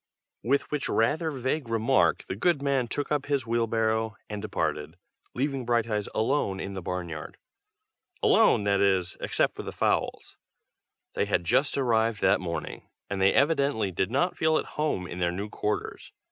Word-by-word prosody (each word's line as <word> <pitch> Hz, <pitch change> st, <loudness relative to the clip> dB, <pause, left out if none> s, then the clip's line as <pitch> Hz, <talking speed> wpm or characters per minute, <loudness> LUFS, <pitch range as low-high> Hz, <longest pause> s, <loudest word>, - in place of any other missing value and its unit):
With 140 Hz, +4 st, 0 dB
which 150 Hz, -2 st, -2 dB
rather 155 Hz, +9 st, +1 dB
vague 130 Hz, -1 st, -2 dB
remark 115 Hz, -, +2 dB
the -, -, -5 dB
good 160 Hz, -, +2 dB
man 140 Hz, -3 st, 0 dB
took 145 Hz, +6 st, -3 dB
up 145 Hz, -2 st, 0 dB
his 140 Hz, -4 st, 0 dB
wheelbarrow 110 Hz, -1 st, 0 dB
and 105 Hz, -1 st, -5 dB
departed, 75 Hz, -5 st, -3 dB, 0.4 s
leaving 135 Hz, 0 st, -1 dB
Brighteyes 115 Hz, -3 st, 0 dB
alone 110 Hz, -4 st, 0 dB
in 100 Hz, +1 st, -5 dB
the 95 Hz, -, -5 dB
barn 90 Hz, 0 st, -3 dB
yard. 75 Hz, -2 st, -7 dB, 0.9 s
Alone, -, -, +5 dB
that 100 Hz, -1 st, +2 dB
is, 95 Hz, -3 st, +2 dB
except -, -, +1 dB
for -, -, -6 dB
the -, -, -6 dB
fowls. -, -, -1 dB, 0.8 s
They -, -, 0 dB
had -, -, 0 dB
just 135 Hz, -, +1 dB
arrived 115 Hz, -4 st, +1 dB
that 95 Hz, -1 st, +3 dB
morning, 85 Hz, -2 st, -5 dB, 0.2 s
and 100 Hz, -1 st, -2 dB
they 95 Hz, -, +5 dB
evidently 140 Hz, -8 st, +2 dB
did 95 Hz, +2 st, -1 dB
not 140 Hz, +9 st, +1 dB
feel 160 Hz, 0 st, +3 dB
at -, -, -2 dB
home 150 Hz, -12 st, -1 dB
in 90 Hz, 0 st, -7 dB
their 85 Hz, -1 st, +1 dB
new 100 Hz, +4 st, -4 dB
quarters. 105 Hz, 0 st, -3 dB
110 Hz, 170 wpm, -27 LUFS, 95-140 Hz, 0.9 s, Alone